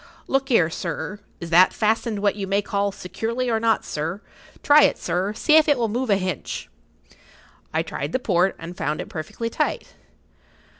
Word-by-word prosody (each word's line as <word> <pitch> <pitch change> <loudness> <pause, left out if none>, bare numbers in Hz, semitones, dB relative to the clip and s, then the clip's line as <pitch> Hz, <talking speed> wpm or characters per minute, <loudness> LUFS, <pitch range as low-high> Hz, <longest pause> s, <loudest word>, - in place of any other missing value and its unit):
Look 270 0 0
'ere, 180 -10 +3
sir, 185 +4 -4 0.2
is 170 -1 -7
that 180 +3 +6
fastened 220 -1 0
what 205 - +2
you 200 -2 -4
may 200 +1 +1
call 200 0 -1
securely, 230 +6 -3
or 225 - +1
not, 225 0 +1
sir? 160 +6 -3 0.4
Try 295 +1 +7
it, - - +4
sir, 185 +3 -1
see 305 +7 +4
if 315 - +5
it 290 - +4
will 230 -2 0
move 245 +3 -2
a 200 - +5
hinch." 185 -7 -4 1.0
I - - 0
tried 145 +2 -5
the - - +1
port, 190 -6 +1
and 165 +2 -8
found 150 -2 -2
it - - -6
perfectly 230 +9 -5
tight. - - -2
205 Hz, 185 wpm, -23 LUFS, 180-230 Hz, 1.0 s, Try